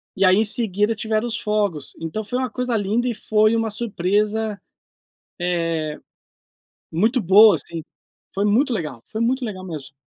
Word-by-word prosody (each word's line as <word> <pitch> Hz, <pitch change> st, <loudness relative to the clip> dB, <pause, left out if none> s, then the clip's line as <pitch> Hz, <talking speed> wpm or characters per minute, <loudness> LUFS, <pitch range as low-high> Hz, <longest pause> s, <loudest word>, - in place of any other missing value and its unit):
e 195 Hz, -, +2 dB
aí 185 Hz, 0 st, +6 dB
em 215 Hz, -, +3 dB
seguida 215 Hz, -1 st, +1 dB
tiveram 220 Hz, +1 st, -1 dB
os 230 Hz, -2 st, -2 dB
fogos, 205 Hz, -9 st, -1 dB
então 165 Hz, +7 st, -3 dB
foi 220 Hz, +4 st, -3 dB
uma 255 Hz, -1 st, -1 dB
coisa 250 Hz, 0 st, -2 dB
linda 220 Hz, +4 st, 0 dB
e 240 Hz, -, 0 dB
foi 215 Hz, +1 st, +2 dB
uma 225 Hz, -1 st, 0 dB
surpresa, 210 Hz, 0 st, -1 dB, 0.8 s
eh, 165 Hz, -3 st, -1 dB, 0.9 s
muito 220 Hz, +9 st, +2 dB
boa 205 Hz, +3 st, +7 dB
assim, 165 Hz, +1 st, -6 dB, 0.5 s
foi 200 Hz, -, -1 dB
muito 245 Hz, +6 st, +2 dB
legal, 150 Hz, -, -4 dB
foi 220 Hz, -, -5 dB
muito 250 Hz, +2 st, 0 dB
legal 190 Hz, -4 st, -6 dB
mesmo. 155 Hz, -5 st, -8 dB
210 Hz, 160 wpm, -22 LUFS, 180-225 Hz, 0.9 s, boa